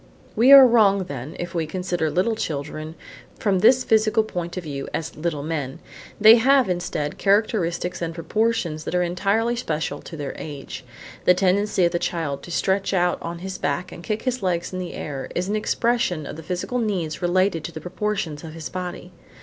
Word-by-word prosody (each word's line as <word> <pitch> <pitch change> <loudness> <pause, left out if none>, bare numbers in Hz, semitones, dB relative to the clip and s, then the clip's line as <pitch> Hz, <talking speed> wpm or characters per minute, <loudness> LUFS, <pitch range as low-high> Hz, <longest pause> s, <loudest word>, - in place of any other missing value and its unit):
We 240 +5 +5
are 275 -1 +11
wrong 210 -5 +4
then 140 -3 -7
if 175 - -5
we 165 -3 -1
consider 175 -1 -2
little 190 +8 +1
children 155 -2 -4 0.4
from 195 -3 +1
this 245 +6 +5
physical 220 0 +3
point 175 -4 -5
of 185 - -3
view 140 -3 -5
as 160 - -4
little 155 -2 -3
men. 145 -4 -3 0.4
They 220 +2 +9
have, 265 +2 +4
instead, 175 -5 -3
characteristics 185 -4 +1
and 165 -1 -2
proportions 175 -3 -1
that - - -3
are 180 - +3
entirely 200 +7 0
special 155 -9 -3
to 165 - -9
their 145 -2 -4
age. 140 -3 -7 0.4
The 180 - +6
tendency 195 0 +2
of 170 - +2
the 175 - 0
child 155 -6 -2
to 175 - -10
stretch 195 +2 0
out 175 -1 +1
on 170 0 -5
his 190 -1 -5
back 145 +5 -2
and 170 - -9
kick 215 +2 -3
his 255 -2 -1
legs 180 -2 -1
in 185 - -3
the 180 -1 -5
air 135 -3 -5
is 180 +1 -1
an 210 - 0
expression 215 -7 0
of 160 +3 -8
physical 185 +9 -3
needs 190 -9 -2
related 180 -1 +1
to - - -5
the 160 - -7
proportions 180 -3 -3
of 160 -1 -8
his 160 -1 -6
body. 180 -1 -6
180 Hz, 190 wpm, -23 LUFS, 160-210 Hz, 0.4 s, are